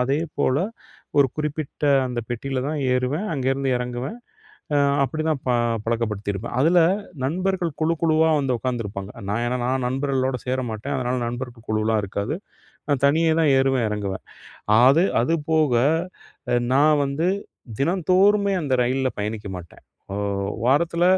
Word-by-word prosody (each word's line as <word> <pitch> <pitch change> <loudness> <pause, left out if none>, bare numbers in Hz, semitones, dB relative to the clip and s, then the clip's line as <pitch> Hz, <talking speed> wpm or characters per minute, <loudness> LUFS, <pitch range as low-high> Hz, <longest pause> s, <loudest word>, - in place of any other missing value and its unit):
அதேபோல 140 0 0 0.6
ஒரு 140 - +6
குறிப்பிட்ட 150 -1 -3 0.2
அந்த 120 -1 -3
பெட்டில 130 +2 -3
தான் 155 0 -2
ஏறுவேன். 130 +10 0
அங்கேருந்து 135 -1 0
இறங்குவேன். 125 - -4 0.6
அ - - +4 0.3
அப்படிதான் 155 -1 -1
ப - - +2 0.3
பழக்கப்படுத்தியிருப்பேன். 110 -2 -2
அதில 170 +5 +4 0.5
நண்பர்கள் 180 +2 -1
குழு 165 +1 +2
குழுவா 160 0 +4
வந்து 130 -3 0
உக்காந்துருப்பாங்க. 105 -6 -4 0.2
நான் 115 +3 0
என்னனா 125 +1 -1 0.2
நான் 130 -2 -1
நண்பர்களோடு 130 -1 -1
சேர 130 +1 0
மாட்டேன். 110 +7 -4
அதனால 125 0 -1
நண்பர்க்கு 120 -1 -6
குழுவலாம் 110 0 +1
இருக்காது. 100 - -3 0.5
நான் 140 -2 +1
தனியே 160 +2 +3
தான் 150 -3 +4
ஏறுவேன், 135 -4 +2
இறங்குவேன். 100 -2 -3 0.6
அது 140 +8 +6 0.2
அதுபோக, 155 -2 +1 0.8
அ - - +4 0.2
நான் 150 +1 +4
வந்து 145 +6 0 0.5
தினந்தோறுமே 190 +5 +3
அந்த 135 -3 0
ரயில்ல 130 +1 0
பயணிக்க 105 0 -4
மாட்டேன். 85 -1 -14 0.3
ஓ - - -3 0.5
வாரத்துல 170 +5 +2
135 Hz, 130 wpm, -23 LUFS, 120-155 Hz, 0.8 s, ஒரு